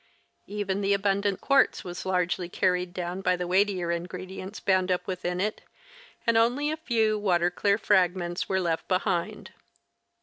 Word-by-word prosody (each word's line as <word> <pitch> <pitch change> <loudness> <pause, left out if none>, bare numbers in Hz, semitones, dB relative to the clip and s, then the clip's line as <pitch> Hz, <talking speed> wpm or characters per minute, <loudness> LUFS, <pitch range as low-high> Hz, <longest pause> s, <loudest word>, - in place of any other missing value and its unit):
Even 200 -1 -2
the 200 0 +2
abundant 200 0 0
quartz 275 -1 +3
was 180 +1 -6
largely 180 -1 0
carried 180 -1 0
down 180 0 -4
by 180 -1 +2
the 180 0 -3
weightier 185 -1 +1
ingredi 180 +2 -4
ents 190 +3 -7
bound 185 -1 +1
up 180 - 0
within 180 -1 -3
it, 210 +3 -1 0.6
and 230 -1 +3
only 250 +6 +2
a 310 - -3
few 225 -8 +1
water 175 -3 +2
clear 200 +2 +1
fragments 180 -3 +1
were 190 - +1
left 170 -3 -1
behind. 185 -2 -1
185 Hz, 160 wpm, -27 LUFS, 180-205 Hz, 0.6 s, quartz